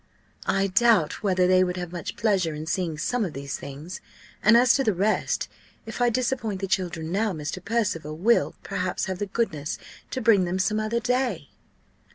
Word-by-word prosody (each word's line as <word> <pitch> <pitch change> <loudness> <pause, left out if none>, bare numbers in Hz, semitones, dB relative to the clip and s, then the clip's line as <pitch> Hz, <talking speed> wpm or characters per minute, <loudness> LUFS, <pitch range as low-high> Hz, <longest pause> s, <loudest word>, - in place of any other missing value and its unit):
"I 195 0 +2
doubt 195 -4 +3
whether 185 -3 +2
they 185 0 +5
would 180 0 -2
have 175 -1 -5
much 175 -1 -5
pleasure 190 -8 +1
in 155 +1 -6
seeing 175 -2 -2
some 245 +9 0
of 175 -6 -3
these 140 0 -5
things! 145 +6 -8 0.4
and 220 +3 +6
as 245 0 +6
to 270 - +2
the 215 -6 +1
rest, 205 +4 0 0.4
if 225 +2 -6
I 245 - +5
disappoint 240 -4 -1
the 195 - -2
children 170 -3 -2
now, 205 +2 +1
Mr. 155 +3 -5
Percival 185 -9 -1
will, 175 -5 +2
perhaps, 185 -1 -2
have 190 -1 -4
the 205 - -2
goodness 175 -8 -2 0.3
to - - -3
bring 215 -6 +4
them 175 +2 -1
some 210 +3 +1
other 215 +2 0
day." 250 +2 -1
190 Hz, 190 wpm, -25 LUFS, 170-225 Hz, 0.4 s, and